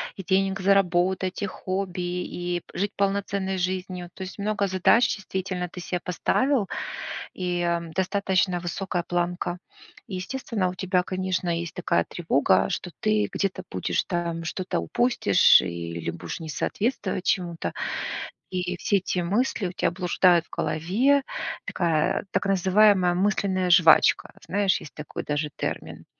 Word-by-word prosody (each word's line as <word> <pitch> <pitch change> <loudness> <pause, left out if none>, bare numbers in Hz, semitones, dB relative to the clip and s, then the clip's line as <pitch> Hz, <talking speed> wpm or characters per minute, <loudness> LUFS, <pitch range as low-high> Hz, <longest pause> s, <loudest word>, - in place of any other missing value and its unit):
и 195 - -7
денег 195 +1 +1
заработать, 185 -1 +2
и 200 - +1
хобби, 185 -1 -4
и 175 0 -3
п - - -12
жить 205 +1 0
полноценной 195 -1 0
жизнью. 180 -1 -3
То - - -12
есть 185 +2 -8
много 205 -1 0
задач 190 +6 +4
действительно 185 -2 -3
ты 180 +1 -9
се 180 +1 -2
поставил, 220 +6 +1 0.6
и, 180 -1 -2
м, 170 -1 -1
достаточно 190 0 +1
высокая 175 0 -2
планка. 175 0 -2 0.5
Естественно, 195 0 -2
у 180 - -6
тебя, 180 -1 +1
конечно, 185 -1 -2
есть 170 -1 -2
такая 85 0 +1
тревога, 160 -5 +2
что 180 - -4
ты 215 -1 +2
где-то 195 -2 -2
будешь 90 -2 0
там 170 -1 -2
что-то 185 +3 -2
упустишь 240 - +4
или 85 -1 -4
будешь 85 - -6
не 160 -1 -7
соответствовать 190 - -2
чему-то. 175 -3 -1 0.8
И 180 -1 -2
все 200 +2 +2
эти 185 -1 -2
мысли 200 +3 0
у 175 - -6
тя - - 0
блуждают 175 -1 +3
в - - -31
голове. 240 - +2 0.4
Такая 165 -4 +1
так - - 0
называемая 190 -1 +4
мысленная 185 -1 +1
жвачка. 175 -2 +6
Знаешь, 200 -1 +1
есть - - -11
такой 150 -1 -6
даже 150 0 -1
термин. - - -5
185 Hz, 140 wpm, -25 LUFS, 175-195 Hz, 0.8 s, жвачка